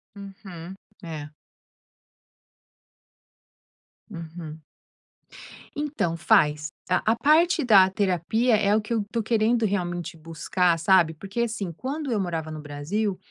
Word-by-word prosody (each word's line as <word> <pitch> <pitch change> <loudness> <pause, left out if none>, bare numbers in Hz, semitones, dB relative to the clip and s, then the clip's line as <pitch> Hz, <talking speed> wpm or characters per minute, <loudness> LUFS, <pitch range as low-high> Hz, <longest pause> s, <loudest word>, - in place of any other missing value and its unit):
Uhum, 190 -3 -10 0.3
é. 155 -3 -7 2.8
Uhum. 165 -3 -8 1.1
Então, 285 - -2
faz. 150 -1 +3 0.2
A 185 - +2
a - - -3
parte 315 +5 +3
da 195 -6 +6
terapia 205 +5 +1
é 205 0 +2
o 220 - +2
que 215 +2 -4
eu 220 -2 0
tô 230 -2 -1
querendo 225 +1 +2
realmente 175 -4 -3
buscar, 165 +2 0
sabe, 170 -1 +4
porque, 195 +8 -5
assim, 220 -6 -2
quando 275 - -4
eu 220 - +1
morava 165 -4 -3
no 155 - -6
Brasil, 170 +8 -3
190 Hz, 115 wpm, -25 LUFS, 165-220 Hz, 2.8 s, da